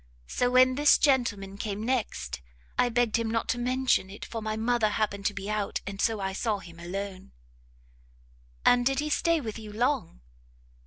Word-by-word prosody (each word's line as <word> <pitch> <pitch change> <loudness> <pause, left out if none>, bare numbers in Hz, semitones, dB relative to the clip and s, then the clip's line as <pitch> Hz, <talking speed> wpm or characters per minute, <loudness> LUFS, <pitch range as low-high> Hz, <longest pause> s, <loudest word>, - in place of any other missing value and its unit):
so 245 - 0
when 255 +1 +5
this 290 +2 +5
gentleman 205 -8 +1
came 210 0 -3
next, 240 - -2 0.3
I 245 - +3
begged 235 -1 +2
him 230 -1 -1
not 225 0 -1
to 245 - 0
mention 255 -5 +1
it, 200 - -8
for 225 - -5
my 215 0 -3
mother 225 -1 +2
happened 205 -1 -1
to 205 - -2
be 195 0 -5
out, 210 -1 -2
and 200 0 -5
so 225 -2 +1
I 190 -1 -2
saw 215 +1 0
him 170 -3 -12
alone." 190 +2 -6 1.3
"And 245 0 +5
did 270 +2 +1
he 300 +2 -1
stay 335 +2 +2
with 225 -3 -5
you 215 -1 -9
long?" 240 - -1
220 Hz, 180 wpm, -28 LUFS, 200-245 Hz, 1.3 s, when